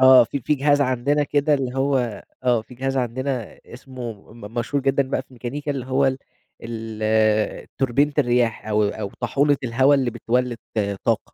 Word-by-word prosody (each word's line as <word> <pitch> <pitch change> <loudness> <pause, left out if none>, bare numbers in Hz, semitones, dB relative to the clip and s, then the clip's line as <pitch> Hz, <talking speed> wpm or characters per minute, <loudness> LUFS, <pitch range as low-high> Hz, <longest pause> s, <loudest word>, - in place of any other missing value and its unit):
آه، 130 -1 +8
في 140 +5 -4
في 150 +5 +1
جهاز 145 +1 +3
عندنا 140 +2 +1
كده 145 +1 +2
اللي 135 -2 -2
هو 130 -5 0 0.2
آه 120 -3 +3
في 125 - -14
جهاز 135 +2 -2
عندنا 130 -1 -2
اسمه 120 -5 -9
م 110 -1 -11
مشهور 130 +4 -1
جدًا 135 +1 +2
بقى 130 - 0
في 130 - -25
ميكانيكا، 135 +4 -5
اللي 135 -3 -3
هو 135 +1 +2
ال 130 0 0 0.4
ال 110 -1 0
توربينة 135 +3 +2
الرياح 120 -5 +1
أو 105 0 +2
أو 100 -1 -5
طاحونة 140 +4 +2
الهوا 130 +4 +4
اللي 130 -3 +1
بتولِّد 120 +1 -1 0.5
طاقة. - - +2
125 Hz, 170 wpm, -22 LUFS, 115-140 Hz, 0.5 s, آه